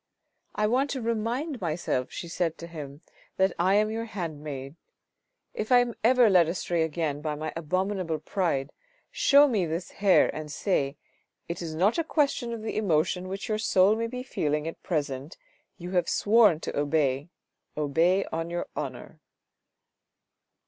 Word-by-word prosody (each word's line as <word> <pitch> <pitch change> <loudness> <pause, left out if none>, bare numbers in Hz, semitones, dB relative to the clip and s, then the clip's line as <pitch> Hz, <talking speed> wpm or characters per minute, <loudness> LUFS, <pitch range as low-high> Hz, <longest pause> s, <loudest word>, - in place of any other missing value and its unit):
" - - -51
I 210 - +1
want 260 +6 +2
to 270 - -2
remind 235 +5 -2
myself," 155 -6 -1
she 170 - -6
said 165 -1 -2
to 170 - -8
him, 150 -3 -9 0.2
" - - -31
that 190 -1 +3
I 185 +3 +3
am 215 +1 +3
your 225 +1 -3
handmaid. 150 -8 -6 0.8
If 215 +3 -4
I 250 - +8
am 245 -1 +2
ever 245 0 +6
led 180 -5 +5
astray 170 -1 -1
again 155 -2 -1
by 150 -1 -2
my 155 +1 -5
abominable 185 +1 -1
pride, 160 -4 -1 0.4
show 285 +1 +6
me 210 -10 0
this 165 +3 -4
hair 195 -2 +3
and 155 -1 -6
say, 145 -4 -1 0.2
* - - -49
It 170 - -5
is 160 -2 -5
not 200 - +2
a - - +2
question 280 -6 0
of 230 -2 -5
the 220 - -3
emotion 180 -2 +1
which 195 +1 -5
your 215 -1 -1
soul 195 -1 +4
may 230 +1 -2
be 250 +2 -6
feeling 150 - -1
at 165 - -7
present, 145 -2 -3 0.4
you 175 +1 -7
have 180 -2 +1
sworn 210 -6 +4
to - - -5
obey, 145 0 0 0.5
obey 165 +6 +2
on 165 +1 -2
your 175 0 -3
honour." - - -6
175 Hz, 170 wpm, -27 LUFS, 155-215 Hz, 0.8 s, I